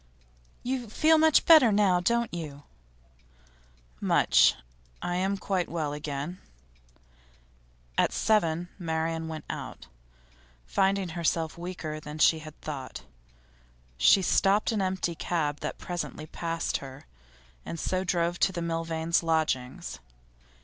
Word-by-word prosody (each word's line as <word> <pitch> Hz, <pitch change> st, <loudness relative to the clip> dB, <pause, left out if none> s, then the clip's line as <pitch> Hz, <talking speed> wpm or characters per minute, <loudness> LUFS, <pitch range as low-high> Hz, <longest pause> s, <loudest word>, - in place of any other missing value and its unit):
'You 250 Hz, -2 st, -3 dB
feel 315 Hz, +7 st, +4 dB
much 315 Hz, -1 st, +5 dB
better 310 Hz, -9 st, +8 dB
now, 200 Hz, -3 st, +3 dB
don't 235 Hz, +4 st, 0 dB
you?' 150 Hz, -4 st, -6 dB, 1.4 s
'Much. -, -, +4 dB, 0.4 s
I 175 Hz, 0 st, -2 dB
am 195 Hz, +2 st, 0 dB
quite 190 Hz, -1 st, -1 dB
well 155 Hz, -4 st, -2 dB
again.' 150 Hz, +3 st, -5 dB, 1.6 s
At -, -, +3 dB
seven, 175 Hz, -5 st, +1 dB
Marian 160 Hz, -1 st, -2 dB
went 160 Hz, -1 st, -6 dB
out. -, -, -7 dB, 0.8 s
Finding 190 Hz, -, +1 dB
herself 165 Hz, -1 st, -1 dB
weaker 170 Hz, -3 st, -5 dB
than 150 Hz, 0 st, -8 dB
she 160 Hz, +1 st, +4 dB
had 155 Hz, 0 st, -11 dB
thought, 135 Hz, -4 st, -6 dB, 0.9 s
she 125 Hz, -, +5 dB
stopped 200 Hz, +4 st, +3 dB
an 215 Hz, -3 st, 0 dB
empty 185 Hz, -2 st, -1 dB
cab 155 Hz, -3 st, -2 dB
that -, -, -4 dB
presently 175 Hz, -3 st, -5 dB
passed 165 Hz, +1 st, -2 dB
her, 135 Hz, +2 st, -11 dB, 0.6 s
and 165 Hz, -, -6 dB
so 185 Hz, +3 st, -1 dB
drove 170 Hz, -1 st, 0 dB
to 195 Hz, -, +3 dB
the 170 Hz, -2 st, -4 dB
Milvains' 165 Hz, 0 st, 0 dB
lodgings. 130 Hz, -, -1 dB
170 Hz, 120 wpm, -28 LUFS, 155-190 Hz, 1.6 s, better